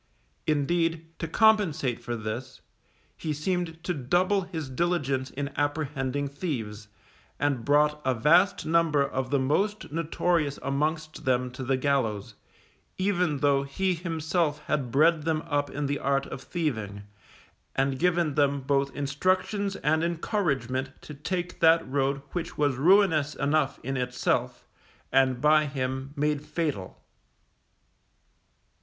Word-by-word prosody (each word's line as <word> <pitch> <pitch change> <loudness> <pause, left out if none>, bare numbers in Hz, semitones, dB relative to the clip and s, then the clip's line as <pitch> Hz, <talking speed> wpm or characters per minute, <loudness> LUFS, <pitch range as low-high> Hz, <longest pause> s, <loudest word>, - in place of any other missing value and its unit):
Indeed, 165 +2 0
to 165 - -3
compensate 170 - +2
for 120 - -3
this, 115 +4 -6 0.5
he 155 -2 -3
seemed 165 +1 -2
to 180 - -1
double 175 +8 +1
his 165 -5 -5
diligence 135 -3 -1
in 140 0 -4
apprehending 145 -2 -1
thieves, 115 - -5 0.5
and 140 -5 0
brought 150 +2 +3
a 130 -1 +1
vast 175 - +4
number 160 -3 +3
of 130 -1 -3
the 140 - +2
most 190 +10 0
notorious 165 -1 0
amongst 155 +3 -2
them 125 -1 +1
to 130 +1 -7
the 130 +1 +1
gallows, 130 -7 0 0.6
even 180 -6 0
though 140 -1 +3
he 185 +7 -1
himself 160 -2 -1
had 140 -5 -1
bred 155 +5 +4
them 160 0 -1
up 145 -3 -1
in 145 +2 -3
the 140 +1 -1
art 140 0 +1
of 130 - -7
thieving, 110 - -3 0.7
and 135 0 0
given 175 -3 +2
them 140 -1 +2
both 140 +1 +1
instructions 185 +8 0
and 160 -2 +1
encouragement 140 - -1
to 150 - -9
take 175 +5 -4
that 165 -2 +5
road 135 +1 0
which 170 -2 -4
was 145 -3 +2
ruinous 160 -1 +4
enough 145 0 0
in 135 +2 -3
itself, 125 0 -1 0.5
and 130 -2 +3
by 150 0 +4
him 130 0 -3
made 150 0 0
fatal. 150 - -3
145 Hz, 130 wpm, -27 LUFS, 135-165 Hz, 0.7 s, that